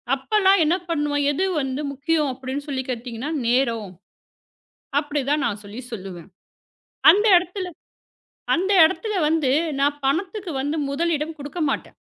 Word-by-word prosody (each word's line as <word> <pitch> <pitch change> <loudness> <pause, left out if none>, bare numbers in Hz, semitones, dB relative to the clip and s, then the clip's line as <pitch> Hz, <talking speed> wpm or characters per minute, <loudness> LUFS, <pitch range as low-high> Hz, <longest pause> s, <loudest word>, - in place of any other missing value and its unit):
அப்போ 270 +11 -4
எல்லாம் 385 -2 +5
என்ன 330 - +3
பண்ணுவோம்? 290 -2 0
எது 375 +6 0 0.2
வந்து 270 +2 -3
முக்கியம் 295 +1 0
அப்படியென்று 265 +3 -6
சொல்லி 265 -2 -2
கேட்டீர்களென்றால், 250 +5 -4
நேரம், 235 -5 +1 1.1
அப்படி 290 -1 -3
தான் 295 -1 +1
நான் 205 0 -3
சொல்லிச் 240 +5 -9
சொல்லுவேன். 190 -4 -8 0.8
அந்த 415 +4 +2
இடத்தில் 360 +1 -2 0.9
அந்த 380 +3 0
இடத்தில் 400 +4 0
வந்து 310 -5 +1 0.3
நான் 290 +1 +1
பணத்துக்கு 365 +5 -1
வந்து 290 +4 -2
முதலிடம் 315 +1 -1
கொடுக்கமாட்டேன். 290 0 -3
290 Hz, 130 wpm, -23 LUFS, 260-335 Hz, 1.1 s, எல்லாம்